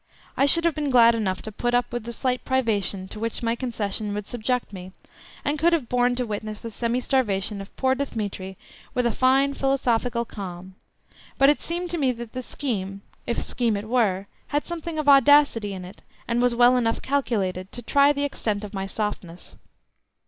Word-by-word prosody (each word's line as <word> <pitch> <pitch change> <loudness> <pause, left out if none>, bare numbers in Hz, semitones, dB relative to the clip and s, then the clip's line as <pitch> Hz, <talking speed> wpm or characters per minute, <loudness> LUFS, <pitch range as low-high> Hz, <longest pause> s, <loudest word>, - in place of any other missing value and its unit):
I 275 - +3
should 335 +4 +5
have 335 - +3
been 295 -2 -2
glad 235 -2 +6
enough 195 -5 -2
to 220 - -6
put 240 +3 -1
up 245 -1 0
with 240 -2 -3
the 235 - -5
slight 250 +1 -2
privation 205 -7 0
to 215 - -7
which 230 +1 -3
my 230 0 +1
concession 215 -4 -2
would 210 -1 -4
subject 245 0 -2
me, 185 0 -9 0.5
and 290 +1 0
could 340 +3 +3
have 290 -8 0
borne 245 0 +2
to 250 0 -1
witness 215 -1 -5
the 230 - -7
semi 235 +2 -1
starvation 210 -6 0
of 195 - -12
poor 260 -1 +2
Dthemetri 205 -8 -4 0.4
with 250 -1 +1
a 235 - +3
fine, 265 +4 +3
philosophical 245 -3 0
calm, 185 -3 -8 0.6
but 275 +1 +6
it 290 - +2
seemed 345 +1 -4
to 345 - -2
me 265 -3 +3
that 235 -1 -9
the 255 - -3
scheme, 200 -8 -4 0.2
if 235 - -1
scheme 230 -4 0
it 205 +2 -6
were, 210 -6 +1 0.2
had 290 +1 -1
something 335 -1 -5
of 305 -1 -2
audacity 275 -6 +5
in 185 -2 -6
it, 185 - -13 0.3
and 235 0 +1
was 245 -1 +2
well 245 +1 +5
enough 230 -2 0
calculated 200 -9 -1
to 240 - -7
try 280 +4 +4
the 285 0 -1
extent 215 -7 -2
of 210 - -7
my 195 -1 -3
softness. 195 -4 -5
235 Hz, 200 wpm, -24 LUFS, 205-265 Hz, 0.6 s, glad